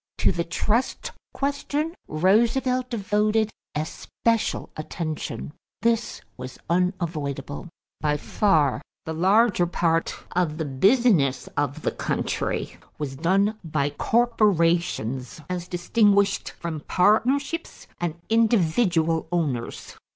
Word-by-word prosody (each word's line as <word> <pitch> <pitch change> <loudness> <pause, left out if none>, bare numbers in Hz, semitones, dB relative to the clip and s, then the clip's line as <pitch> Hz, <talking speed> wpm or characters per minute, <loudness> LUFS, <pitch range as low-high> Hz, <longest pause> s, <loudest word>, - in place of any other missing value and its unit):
= - - -66
To - - +6
the 170 -2 -1
trust 230 - -1 0.2
question, 285 +3 -2
Roosevelt 235 +9 +2
devoted 215 0 +1 0.2
especial 225 +8 -1
attention. 155 -1 -5 0.3
This 230 0 0 0.2
was 125 0 -8
unavoidable. 170 -5 -2 0.3
By 150 -1 +1
far 150 -6 +2 0.2
the 160 - -3
larger 190 +2 +3
part 165 -1 0 0.2
of 170 -4 0
the 160 - -2
business 155 - +3
of 145 -1 -1
the - - +1
country - - -2 0.2
was 145 -3 -4
done 195 +8 +1
by 150 -3 -1
corporations 170 - +1
as 175 -1 -3
distinguished 200 +2 +2
from 165 -2 -5
partnerships 265 - +1
and 175 -2 -2
individual 175 -7 +2
owners. 145 -9 -2
175 Hz, 100 wpm, -25 LUFS, 155-225 Hz, 0.3 s, To